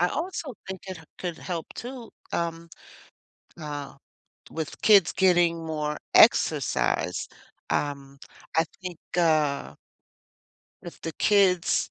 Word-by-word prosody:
I 175 - +4
also 320 - -4
think 190 -1 -6
it 185 -3 -6
h 160 - -14
could 175 -3 -4
help 170 -3 -4
too, 245 -1 -8 0.2
um, 170 0 -2 0.9
uh, 145 -2 -6 0.6
with 160 -2 -5
kids 200 -5 +6
getting 175 -3 +3
more 150 -1 -2 0.2
exercise. 90 +3 +3 0.4
Um, 140 -1 -2 0.4
I 160 - +5 0.2
think, 180 -3 -6 0.2
uh 155 -4 +2 1.1
if 175 -2 -10
the 165 - -5
kids 190 -3 +3
170 Hz, 110 wpm, -26 LUFS, 155-185 Hz, 1.1 s, kids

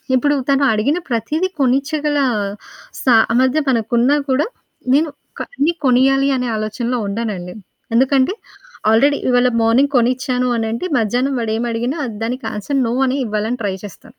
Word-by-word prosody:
ఇప్పుడు 290 +3 +2
తను 275 0 +3
అడిగిన 225 +10 +1
ప్రతీదీ 305 +10 -1
కొనిచ్చగల 290 +3 +1 0.9
సామర్థ్యం 255 +4 +3
మనకున్నా 240 +3 +2
కూడా, 270 +7 +1 0.5
నేను 305 +3 +3 0.3
క - - -3
అన్నీ 315 +4 +1
కొనియ్యాలి 270 +1 +3
అనే 250 -1 -2
ఆలోచనలో 215 +3 -2
ఉండనండి. 200 -4 -4 0.4
ఎందుకంటే 265 +6 +3 0.6
ఆల్రెడీ 280 +6 +4
ఇవ్వాళ 250 0 +3
మార్నింగ్ 250 +6 +3
కొనిచ్చాను 250 +1 +1
అనంటే, 225 +7 -2
మధ్యాహ్నం 245 +5 0
వాడేమి 225 +1 -1
అడిగిన 240 +5 -2 0.3
దానికి 250 +4 -4
ఆన్సర్, 270 +7 -2
నో 230 - -1
అనే 260 +2 0
ఇవ్వాలని 215 +3 -2
ట్రై 195 -2 -1
చేస్తాను. 195 - -12
250 Hz, 130 wpm, -18 LUFS, 225-275 Hz, 0.9 s, ఆల్రెడీ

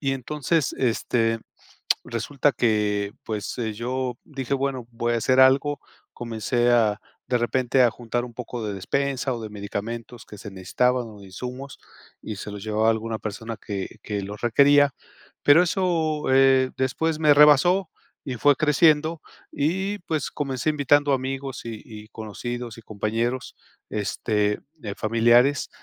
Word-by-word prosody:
Y 135 -2 0
entonces, 145 +3 -1
este 115 -2 0 0.6
resulta 135 +5 0
que, 105 -3 0
pues 105 -2 -4
eh, 110 -3 -2
yo 125 +2 -3
dije: 135 -3 -3
"Bueno, 135 -3 -2
voy 120 0 -1
a - - +2
hacer 130 +3 +3
algo". 135 +2 +4 0.3
Comencé 120 +1 -1
a, 110 -4 +3 0.3
de 125 -1 +1
repente 125 +2 +2
a 120 - +5
juntar 120 +1 -3
un 120 - -10
poco 120 -1 -6
de 105 - -3
despensa 135 +5 -1
o 115 - -6
de 110 - -6
medicamentos 110 +3 -6
que 105 - -11
se 105 - -8
necesitaban 120 +6 0
o 105 -2 -13
de 100 - -12
insumos, 125 +7 -7 0.4
y 110 - -6
se 100 - -7
los 100 -1 -8
llevaba 110 +1 +1
a - - +7
alguna 110 0 -2
persona 110 +2 -6
que 100 -3 -6
que 105 -2 -3
los 105 +2 -7
requería. 140 +3 +4 0.5
Pero 145 +4 +7
eso, 165 -4 0
eh, 135 -1 +5
después 155 +5 0
me 150 -2 +5
rebasó 155 +5 +5 0.3
y 130 - -4
fue 145 +3 +4
creciendo. 155 +2 +3 0.3
Y 190 +8 -1
pues, 160 -4 -3
comencé 135 0 -2
invitando 145 -1 +3
amigos 135 0 -3
y 115 -2 -6
y 110 -2 -11
conocidos 115 +2 -6
y - - -11
compañeros, 115 +4 -2 0.4
este, 105 0 -1 0.2
eh, 100 -3 -5
familiares, 120 +5 +3
125 Hz, 155 wpm, -24 LUFS, 110-140 Hz, 0.6 s, a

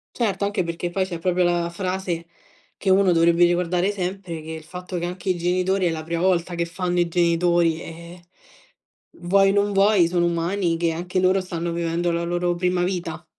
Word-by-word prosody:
Certo, 210 -4 0
anche 200 -2 -1
perché 170 +1 -4
poi 190 +2 0
c'è 170 -3 -6
proprio 180 +1 +1
la 175 -1 +1
frase 180 -1 -3 0.5
che 195 - -1
uno 190 -1 +4
dovrebbe 170 +1 +4
ricordare 175 +2 +1
sempre, 185 -3 -4
che 160 - -9
il 160 -1 -7
fatto 180 +2 -6
che 170 - -3
anche 180 +2 -6
i 185 - +2
genitori 185 +2 +1
è - - +2
la 160 -1 -4
prima 170 +1 -3
volta 180 -1 +1
che 170 - 0
fanno 180 +1 -2
i 175 - +3
genitori, 170 -1 +2
ehm, 170 +1 -10 1.0
vuoi 195 +3 +3
o - - +2
non 205 0 +2
vuoi 195 -3 +4
sono 175 0 +1
umani, 170 +1 0
che 170 0 0
anche 175 +3 -2
loro 185 +1 +3
stanno 170 -2 -4
vivendo 170 +1 -1
la 170 0 -1
loro 175 0 0
prima 180 0 0
vita. 175 -3 -4
175 Hz, 195 wpm, -23 LUFS, 170-185 Hz, 1.0 s, uno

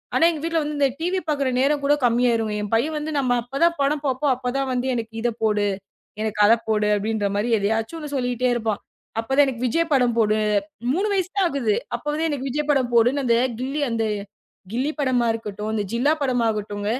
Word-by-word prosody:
ஆனா 330 - +5
எங்க 310 - -6
வீட்டுல 330 -1 0
வந்து 295 0 -4
அந்த 280 - +4
டிவி 360 +3 0
பாக்குற 280 -3 +1
நேரம் 285 +2 +2
கூடக் 290 -1 +2
கம்மியாயிரும்ங்க. 230 -3 +2
என் 210 0 -5
பையன் 295 +8 0
வந்து 300 +1 -4
நம்ம 255 -3 0
அப்பதான் 275 +8 +1
படம் 290 +1 +1
பாப்போம். 265 +1 +1
அப்பதான் 260 +2 -2
வந்து 250 +1 -1
எனக்கு 225 -2 -4
இத 240 - +1
போடு, 210 -2 +2 0.6
எனக்கு 215 -1 -3
அத 220 - +7 0.2
போடு 210 -1 +2
அப்படின்ற 210 0 -1
மாரி 210 +4 0
எதையாச்சும் 225 +9 -2
சொல்லிக்கிட்டே 250 -1 0
இருப்பான். 220 -3 -2 0.4
அப்பத் 245 +5 -2
தான் 290 - +7
எனக்கு 250 -2 -4
விஜய் 330 +6 0
படம் 245 -3 +3
போடு 215 -2 +3 0.6
3 390 +5 0
வயசு 375 -2 0
தான் 390 - +3
ஆகுது. 240 -7 0 0.2
அப்போவே 300 +2 -2
எனக்கு 275 -2 -3
விஜய் 300 +3 -2
படம் 260 -4 +1
போடுன்னு 245 +5 +3
அந்தக் 240 +1 +2
கில்லி 275 +3 -2
அந்தக் 220 -2 0 0.6
கில்லி 260 +6 0
படமா 255 -3 +2
இருக்கட்டும், 210 -1 -5
இந்த 210 - 0
ஜில்லா 270 +6 +3
படமாகட்டும் 220 -6 -1
250 Hz, 190 wpm, -23 LUFS, 225-290 Hz, 0.6 s, அத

